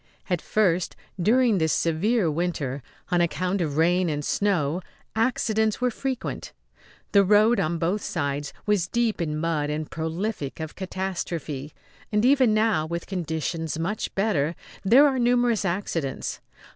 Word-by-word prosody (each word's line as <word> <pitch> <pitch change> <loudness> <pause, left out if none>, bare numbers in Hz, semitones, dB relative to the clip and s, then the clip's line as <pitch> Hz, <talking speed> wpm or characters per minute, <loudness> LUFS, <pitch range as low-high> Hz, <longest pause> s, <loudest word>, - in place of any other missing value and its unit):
At 175 -3 +1
first, 185 -5 +1 0.3
during 230 +1 +4
this 160 -1 +2
severe 170 +3 +1
winter, 150 -5 -2 0.3
on 175 -1 +3
account 185 +2 0
of 150 -3 -2
rain 175 +2 +3
and 150 -1 -2
snow, 180 -5 +1 0.3
accidents 220 -2 +1
were 250 -1 +1
frequent. 260 +1 -4 0.6
The 200 -1 +6
road, 210 +4 +4
on 165 +2 0
both 180 +6 0
sides, 145 -4 -2
was 205 -4 +2
deep 230 -2 0
in 150 -2 -1
mud 155 -2 -1
and 150 0 -3
prolific 160 -1 -3
of 160 0 -5
catastrophe; 170 -6 -4 0.4
and 210 +2 +2
even 260 -3 +5
now, 215 -7 +2
with 170 +1 -4
conditions 160 -3 -3
much 190 +6 -3
better, 175 -6 +1 0.3
there 245 +9 +7
are 265 -2 0
numerous 240 -3 +2
accidents. 170 -6 -2
180 Hz, 140 wpm, -25 LUFS, 160-215 Hz, 0.6 s, there